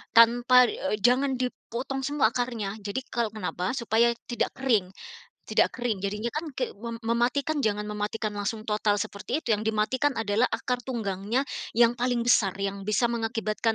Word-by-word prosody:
tanpa 240 +2 +7
eee, 250 -1 -2
jangan 260 +1 +3
dipotong 255 +1 -4
semua 270 -4 +1
akarnya 235 -5 -2
jadi 200 +5 -3
kalau 235 -2 0
kenapa, 185 -3 -3
supaya 235 0 +3 0.2
tidak 240 - -1
kering 225 -9 +2 0.5
tidak - - +1
kering. 240 -5 -1
Jadinya 210 +4 -3
kan 310 +5 -4
ke 250 - -2
mem 230 +3 -7
mematikan 240 +6 +1
jangan 210 -6 0
mematikan 210 +1 -2
langsung 205 +1 -3
total 210 -1 +1
seperti 205 +8 -3
itu - - -4
yang 215 0 +1
dimatikan 220 +6 +1
adalah 225 +1 +1
akar 250 -1 -2
tunggangnya 220 0 -1 0.3
yang 240 +1 +4
paling 245 -1 +1
besar 220 -5 +3
yang 195 0 -3
bisa 235 +3 +2
mengakibatkan 225 -1 -1
230 Hz, 155 wpm, -27 LUFS, 210-250 Hz, 0.5 s, tanpa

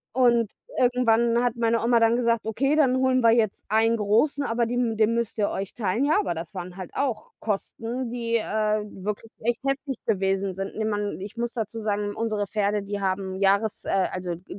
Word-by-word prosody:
und 235 -4 +3 0.3
irgendwann 235 -1 +3
hat 245 -2 +1
meine 230 -1 +1
Oma 235 0 +4
dann 230 +1 +4
gesagt: 235 -2 +1
„Okay, 270 +7 +1
dann 265 -5 +3
holen 260 -1 +3
wir 230 -1 +6
jetzt 225 -3 +1
einen 225 +2 +3
Großen, 225 +8 +2
aber 235 -2 0
den 240 -2 0
den 220 +1 +2
müsst 235 -1 -2
ihr 205 - +2
euch 195 -1 -4
teilen.“ 220 +4 0
Ja, 310 +7 +3
aber 285 - -1
das 165 +3 -7
waren 180 0 -7
halt 185 -3 -7
auch 255 -6 -2
Kosten, 230 +4 -3
die, 235 -1 -2
äh, 215 -1 0 0.2
wirklich 210 +2 -4
echt 240 +1 0
heftig 275 0 -1
gewesen 195 -1 0
sind. 195 +1 -5
Ne, 220 - -1
man 205 -2 -2
ich 200 +3 -8
muss 235 0 -3
dazu 225 -1 -4
sagen, 205 -1 -1
unsere 215 -3 -1
Pferde, 205 0 0
die 200 0 -4
haben 190 0 -1
Jahres 200 +2 +1
äh, - - -4 0.2
also, 180 -2 -3
d 175 - -16
225 Hz, 200 wpm, -25 LUFS, 205-235 Hz, 0.3 s, wir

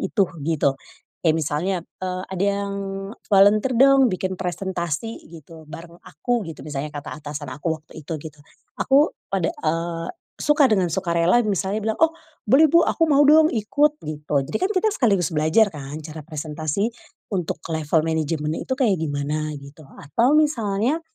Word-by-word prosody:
itu 200 -4 +1 0.2
gitu, 150 -4 +1 0.5
kayak 160 - +5
misalnya, 165 +4 -1 0.2
eee, 185 0 -3
"Ada 190 +1 0 0.2
yang 200 - -4 0.5
volunteer 205 +5 +5
dong 270 -1 +6
bikin 185 0 -2
presentasi" 180 +2 -3 0.2
gitu, 160 0 -12
"bareng 170 +1 -10
aku," 235 - -2
gitu 160 - -8
misalnya 145 0 -4
kata 145 -1 -7
atasan 145 -1 -7
aku 160 +1 -3
waktu 160 - -13
itu 160 - -4
gitu, 150 -1 -10 0.4
aku 280 +3 +4 0.2
pada 185 -4 +1
eee, 165 +1 -3 0.3
suka 295 -2 +4
dengan 190 -4 +2
sukarela 175 +4 +2
misalnya 200 +2 -1
bilang, 220 0 -2
"Oh 325 - +1 0.3
boleh 295 +8 +6
bu 335 0 +5
aku 330 - +2
mau 285 0 +5
dong 310 +2 +6
ikut" 290 +7 +1
gitu 150 -1 -5
jadi 155 - -3
kan 370 - +1
kita 405 +4 +2
sekaligus 195 - +1
belajar 160 +8 +3
kan 145 -1 -7
cara 155 0 -8
presentasi, 155 +5 -2 0.4
untuk 180 -4 -2
level 160 0 +1
management 155 -1 -1
itu - - -1
kayak 220 -9 +3
gimana 150 0 -2
gitu 140 +2 -13
atau 235 - 0
misalnya, 250 -2 +1
175 Hz, 155 wpm, -22 LUFS, 155-225 Hz, 0.5 s, dong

